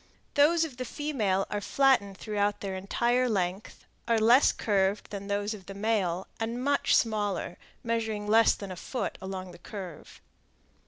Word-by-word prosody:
Those 325 Hz, +3 st, +4 dB
of 270 Hz, -6 st, -9 dB
the 255 Hz, -, -3 dB
female 235 Hz, -10 st, -1 dB
are 205 Hz, -, -2 dB
flattened 245 Hz, -7 st, +2 dB
throughout 205 Hz, -1 st, -1 dB
their 195 Hz, -1 st, -3 dB
entire 240 Hz, +6 st, +1 dB
length, 190 Hz, -1 st, -3 dB, 0.2 s
are 230 Hz, -1 st, +3 dB
less 235 Hz, +5 st, +6 dB
curved 200 Hz, -1 st, 0 dB
than 200 Hz, -1 st, -6 dB
those 205 Hz, +1 st, -1 dB
of 195 Hz, -4 st, -11 dB
the 195 Hz, -, -8 dB
male, 195 Hz, -4 st, 0 dB
and 230 Hz, +2 st, -3 dB
much 285 Hz, +1 st, +2 dB
smaller, 205 Hz, -5 st, 0 dB, 0.3 s
measuring 225 Hz, -3 st, -2 dB
less 225 Hz, +2 st, +5 dB
than 200 Hz, -2 st, -7 dB
a -, -, -5 dB
foot 250 Hz, +8 st, -4 dB
along 190 Hz, -1 st, -6 dB
the 175 Hz, -, -14 dB
curve. 180 Hz, -4 st, -9 dB
210 Hz, 160 wpm, -28 LUFS, 195-235 Hz, 0.3 s, less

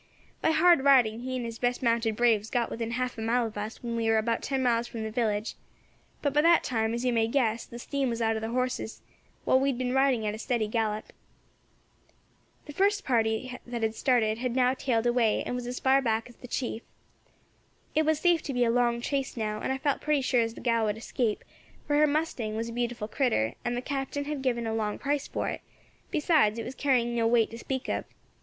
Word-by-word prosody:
By -, -, +2 dB
hard 320 Hz, -2 st, +5 dB
riding 245 Hz, -6 st, +5 dB
he 255 Hz, +1 st, -4 dB
and 250 Hz, -2 st, -3 dB
his 230 Hz, -1 st, -6 dB
best 245 Hz, +1 st, 0 dB
mounted 230 Hz, -2 st, +1 dB
braves 220 Hz, -2 st, +2 dB
got 240 Hz, -2 st, 0 dB
within 230 Hz, 0 st, -3 dB
half 250 Hz, 0 st, -2 dB
a -, -, -4 dB
mile 235 Hz, +2 st, +1 dB
of 220 Hz, -, -6 dB
us 210 Hz, +3 st, -6 dB
when 235 Hz, -1 st, -3 dB
we 230 Hz, -1 st, -1 dB
war 225 Hz, -, +4 dB
about 230 Hz, +1 st, 0 dB
ten 270 Hz, -1 st, -1 dB
miles 235 Hz, -1 st, +2 dB
from 225 Hz, -2 st, -6 dB
the 220 Hz, -, -4 dB
village. 215 Hz, -2 st, -1 dB, 0.7 s
But 285 Hz, -2 st, +1 dB
by 295 Hz, -, +4 dB
that 335 Hz, +1 st, +5 dB
time, 225 Hz, -2 st, 0 dB
as 240 Hz, +2 st, -3 dB
you 250 Hz, -, +2 dB
may 225 Hz, -1 st, +2 dB
guess, 230 Hz, -3 st, 0 dB
the 235 Hz, -, -9 dB
steam 275 Hz, +2 st, -2 dB
was 230 Hz, -1 st, -3 dB
out 225 Hz, -1 st, +1 dB
of 220 Hz, -, -3 dB
their 220 Hz, -, -3 dB
horses, 250 Hz, -2 st, -2 dB, 0.4 s
while 260 Hz, -, +4 dB
we 275 Hz, +1 st, +2 dB
had 260 Hz, -, -1 dB
been 250 Hz, 0 st, -1 dB
riding 265 Hz, -4 st, +2 dB
at 210 Hz, -, -1 dB
a 215 Hz, -, -7 dB
steady 230 Hz, -2 st, -1 dB
gallop. 215 Hz, -1 st, -2 dB, 1.5 s
"The 295 Hz, -, -9 dB
first 405 Hz, +4 st, +1 dB
party 230 Hz, 0 st, 0 dB
that 240 Hz, -1 st, -4 dB
had 220 Hz, 0 st, +1 dB
started 225 Hz, -3 st, +1 dB
had 250 Hz, -1 st, -2 dB
now 255 Hz, 0 st, +3 dB
tailed 245 Hz, -3 st, 0 dB
away, 240 Hz, -2 st, +2 dB
and -, -, -3 dB
was 245 Hz, -1 st, -4 dB
as 250 Hz, 0 st, -4 dB
far 270 Hz, +1 st, +4 dB
back 225 Hz, -2 st, 0 dB
as 240 Hz, -, -16 dB
the 250 Hz, -, -11 dB
chief. 235 Hz, -2 st, -3 dB, 1.1 s
It 310 Hz, -, +3 dB
was 315 Hz, -1 st, +1 dB
safe 345 Hz, -1 st, +3 dB
to 280 Hz, -, -5 dB
be 245 Hz, -1 st, +2 dB
a 230 Hz, -, +2 dB
long 235 Hz, 0 st, +1 dB
chase 270 Hz, 0 st, -2 dB
now, 215 Hz, -1 st, -2 dB
and -, -, -1 dB
I 265 Hz, -, -1 dB
felt 280 Hz, +1 st, -1 dB
pretty 300 Hz, -2 st, +1 dB
sure 255 Hz, -2 st, +2 dB
as 225 Hz, 0 st, -2 dB
the -, -, -10 dB
gal 230 Hz, -2 st, +2 dB
would 210 Hz, 0 st, -1 dB
escape, 225 Hz, -1 st, -2 dB, 0.4 s
for 290 Hz, -, 0 dB
her 305 Hz, 0 st, +5 dB
mustang 285 Hz, -8 st, -1 dB
was 230 Hz, +1 st, -3 dB
a -, -, -7 dB
beautiful 240 Hz, -2 st, -2 dB
critter, 215 Hz, -, 0 dB
and 240 Hz, 0 st, -1 dB
the 245 Hz, -, -4 dB
Captain 280 Hz, +1 st, -3 dB
had 295 Hz, -2 st, -3 dB
given 240 Hz, -3 st, 0 dB
a 225 Hz, -, -2 dB
long 215 Hz, -2 st, -1 dB
price 285 Hz, 0 st, -1 dB
for -, -, -3 dB
it; -, -, -5 dB, 0.5 s
besides, 300 Hz, -, +2 dB
it 230 Hz, -, -4 dB
was -, -, -6 dB
carrying 245 Hz, -4 st, +1 dB
no 230 Hz, -1 st, +2 dB
weight 230 Hz, -1 st, +3 dB
to 230 Hz, -, -7 dB
speak 260 Hz, +1 st, -4 dB
of. -, -, -2 dB
240 Hz, 235 wpm, -28 LUFS, 225-265 Hz, 1.5 s, hard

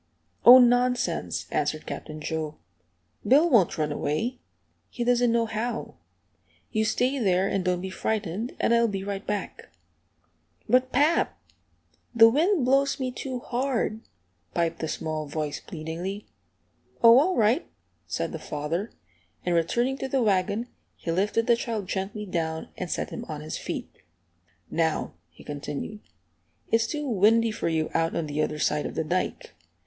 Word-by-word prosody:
"Oh, 245 Hz, +3 st, +11 dB
nonsense!" 245 Hz, 0 st, +2 dB
answered -, -, -1 dB
Captain 155 Hz, -1 st, -7 dB
Joe. 155 Hz, -1 st, -3 dB, 0.7 s
"Bill 285 Hz, +10 st, +5 dB
won't 225 Hz, -, +3 dB
run 150 Hz, -1 st, 0 dB
away. 220 Hz, -, -2 dB, 0.5 s
He 240 Hz, -, -4 dB
doesn't 245 Hz, 0 st, +3 dB
know 230 Hz, 0 st, +2 dB
how. 225 Hz, +1 st, -3 dB, 0.8 s
You 220 Hz, -1 st, +1 dB
stay 255 Hz, +5 st, +1 dB
there, 190 Hz, -3 st, +2 dB
and 195 Hz, -2 st, -1 dB
don't 180 Hz, -1 st, 0 dB
be 190 Hz, 0 st, -5 dB
frightened, 215 Hz, +2 st, -2 dB
and -, -, +2 dB
I'll 235 Hz, 0 st, +4 dB
be 195 Hz, -3 st, -3 dB
right 200 Hz, 0 st, -4 dB
back." 205 Hz, -2 st, -4 dB, 1.0 s
"But, 255 Hz, +3 st, +3 dB
pap, 295 Hz, +6 st, +2 dB, 0.8 s
the 225 Hz, 0 st, +9 dB
wind 315 Hz, -, +2 dB
blows 275 Hz, +2 st, +2 dB
me 255 Hz, -1 st, -2 dB
too 250 Hz, 0 st, -5 dB
hard," 240 Hz, -3 st, -1 dB, 0.5 s
piped 170 Hz, -1 st, 0 dB
the 160 Hz, -, -2 dB
small 155 Hz, -1 st, -3 dB
voice, 150 Hz, 0 st, -3 dB
pleadingly. 175 Hz, +4 st, -6 dB, 0.8 s
"Oh, 230 Hz, +2 st, +9 dB
all 365 Hz, +6 st, +2 dB
right," 230 Hz, +7 st, +2 dB, 0.4 s
said -, -, -2 dB
the -, -, -5 dB
father, 165 Hz, +9 st, -3 dB, 0.6 s
and 175 Hz, -, +1 dB
returning 240 Hz, +11 st, +1 dB
to -, -, -2 dB
the 265 Hz, -1 st, +1 dB
wagon 200 Hz, +3 st, +1 dB, 0.3 s
he 165 Hz, -, -4 dB
lifted 205 Hz, +6 st, +1 dB
the 235 Hz, -, +5 dB
child 225 Hz, -4 st, -4 dB
gently 200 Hz, +3 st, -3 dB
down 160 Hz, -4 st, -3 dB
and 180 Hz, -, -5 dB
set -, -, -2 dB
him -, -, -5 dB
on 150 Hz, -1 st, -6 dB
his 155 Hz, -, -5 dB
feet. -, -, -5 dB, 0.8 s
"Now," 160 Hz, -1 st, -1 dB, 0.2 s
he -, -, -16 dB
continued, 145 Hz, +8 st, -5 dB, 0.7 s
"it's 230 Hz, 0 st, +3 dB
too 295 Hz, -2 st, -3 dB
windy 225 Hz, +1 st, +4 dB
for 210 Hz, -, -2 dB
you 160 Hz, -1 st, -1 dB
out 165 Hz, 0 st, +1 dB
on 165 Hz, -, -1 dB
the 150 Hz, 0 st, -2 dB
other 150 Hz, -, -1 dB
side 150 Hz, 0 st, 0 dB
of -, -, -8 dB
the -, -, 0 dB
dike. 185 Hz, -, -2 dB
210 Hz, 155 wpm, -26 LUFS, 165-245 Hz, 1.0 s, Oh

